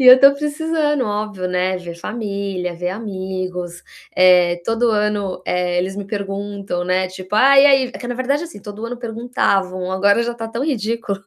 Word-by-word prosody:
e 255 - +3
eu - - +12
estou 275 +2 +7
precisando, 295 -1 -1
óbvio, 205 -3 -3
né, 180 +1 0
ver 170 -1 -8
família, 200 -3 -4
ver 180 +1 -2
amigos. 185 -4 -5 0.3
Eh, 180 -1 +5
todo 230 +1 +1
ano, 210 -3 -1
eh, 180 0 0
eles 190 +2 -2
me 200 - -4
perguntam, 200 -2 -4
né, 185 +1 +1
tipo, 185 +2 -7
"Ah 275 +5 +6
e 280 - +8
aí?" 270 -2 +5
É - - -8
que 240 - -7
na 245 - -3
verdade, 275 +6 -1
assim, 325 -12 -11
todo 210 +2 -8
ano 245 +1 -5
perguntavam, 200 -6 -1
agora 200 +4 +3
já 240 0 -2
está 225 -1 -6
tão 230 +4 -3
ridículo, 230 -7 -2
205 Hz, 185 wpm, -19 LUFS, 185-240 Hz, 0.3 s, eu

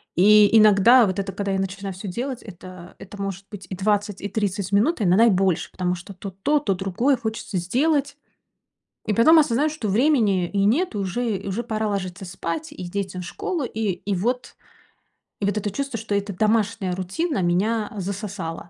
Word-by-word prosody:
И 210 +3 +6
иногда, 215 +3 +6
вот 190 0 -2
это, 195 0 -3
когда 200 +1 -3
я 190 - 0
начинаю 195 +1 -4
всё 190 +3 -8
делать, 245 +7 -4
это 185 -2 -12
это 200 +1 -10
может 195 0 -5
быть 190 -4 -9
и 190 - -4
20, 205 +1 0
и 200 - -3
30 200 -3 -2
минут, 225 +12 +2
иногда 195 +4 +5
и - - +6
больше, 190 -3 +1
потому 180 -1 -1
что 175 +3 -10
то, 195 +1 -7
то, 240 +11 0
то 205 -9 0
другое 195 +9 0
хочется 220 -3 -4
сделать. 285 - 0 0.9
И 215 - 0
потом 310 +10 +6
осознаю, 295 0 +2
что 300 -9 -4
времени 210 - +2
и 200 -1 +1
нет, 265 - +1
уже 205 +2 -2
уже 200 +4 -2
пора 220 -2 -2
ложиться 195 -1 -4
спать 310 - -5
и 300 - -8
детям 190 -1 -4
в - - -7
школу. 325 - -3
И 220 -3 -3 0.2
и - - +2
вот. 245 +7 -2 0.9
И 200 - +1
вот 205 +1 0
это 205 0 -2
чувство, 275 +2 -3
что 215 -1 -4
эта 200 0 -2
домашняя 210 -2 0
рутина 195 - -2
меня 205 +6 0
засосала. 190 -4 -5
205 Hz, 185 wpm, -23 LUFS, 190-230 Hz, 0.9 s, И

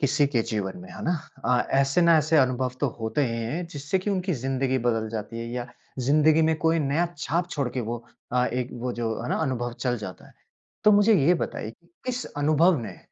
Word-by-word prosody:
किसी 140 +1 +3
के 135 -4 +1
जीवन 100 -3 -2
में, 90 - -11
है - - -8
ना 175 - +2 0.3
अ, 125 -1 +2
ऐसे 135 +5 +3
ना 170 -1 +6
ऐसे 155 +1 +2
अनुभव 130 -1 +2
तो 145 - +2
होते 110 +7 -1
ही 115 - -3
हैं 165 +10 -3
जिससे 150 +5 -1
कि 190 +3 -2
उनकी 185 -1 0
ज़िंदगी 130 0 0
बदल 115 -2 +1
जाती 115 +1 -5
है 115 - -4
या 120 -1 -3 0.3
ज़िंदगी 150 +5 +4
में 160 0 +3
कोई 165 +1 +2
नया 150 +3 +1
छाप 170 +4 -1
छोड़ 140 -4 -1
के 130 - -1
वो 120 +1 -3 0.3
अ, 125 0 +3
एक 125 0 -2
वो 125 +1 -2
जो, 115 -2 -2
है 120 - -4
ना - - +1
अनुभव 120 -4 -2
चल 125 -2 0
जाता 95 -4 -8
है। - - -19 0.5
तो 210 - +7
मुझे 205 +2 +5
ये 175 - +6
बताइए - - -3 0.3
किस 250 -1 -2
अनुभव 155 +4 +4
ने 100 -5 -8
135 Hz, 220 wpm, -26 LUFS, 120-160 Hz, 0.5 s, तो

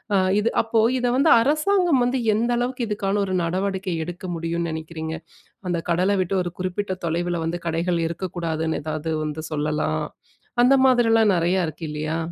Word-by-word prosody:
ஆ - - +5 0.2
இது 225 - +1
அப்போ 225 0 +2 0.2
இத 250 - -1
வந்து 295 +4 +4
அரசாங்கம் 310 +1 +2
வந்து 255 +2 0 0.2
எந்த 235 +3 0
அளவுக்கு 245 0 -2
இதுக்கான 205 -1 0
ஒரு 190 - -3
நடவடிக்கை 190 +1 -2
எடுக்க 175 +2 -7
முடியும்னு 170 +1 -2
நினைக்கிறீங்க? 160 0 -5 0.5
அந்த 175 -1 0
கடல 180 +4 +2
விட்டு 185 +2 -3
ஒரு 175 - -4
குறிப்பிட்ட 185 +1 -2
தொலைவில 170 +1 -1
வந்து 170 +2 -2
கடைகள் 170 +1 0
இருக்கக்கூடாதுன்னு, 165 -2 -3
எதாவது 155 +1 -3
வந்து 155 +1 -4
சொல்லலாம். 150 +1 -1 0.6
அந்த 255 +2 +6
மாதிரிலாம் 225 -4 +4
நிறையா 175 +3 +1
இருக்கு 160 +1 -7
இல்லையா? 155 +1 -2
180 Hz, 155 wpm, -23 LUFS, 165-220 Hz, 0.6 s, அந்த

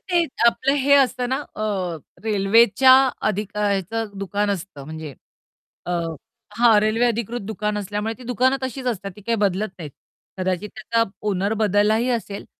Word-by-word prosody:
ते 345 -1 +3 0.2
आपलं 260 +3 +3
हे 280 0 +4
असतं 255 -3 +2
ना, 260 - 0 0.2
अ, - - -4 0.6
रेल्वेच्या 225 +5 +5 0.4
अधिकचं 210 +1 -2
दुकान 205 +1 -1
असतं 180 -7 -5
म्हणजे 155 -1 -8 0.7
अ, - - -3 0.7
हां, 230 -3 +6
रेल्वे 215 +3 +2
अधिकृत 235 0 -2
दुकान 210 0 -2
असल्यामुळे 210 +2 -3
ती - - -12
दुकानं 250 +2 +2
तशीच 260 0 -4
असतात 200 -5 -2
ती - - -12
काही 230 +3 0
बदलत 205 0 0
नाहीत, 155 -4 -7 0.5
कदाचित 185 +2 -2
त्याचा 230 +1 0 0.3
ऑनर 200 +1 0
बदललाही 215 +3 +2
असेल, 210 -4 -3
215 Hz, 145 wpm, -22 LUFS, 200-235 Hz, 0.7 s, हां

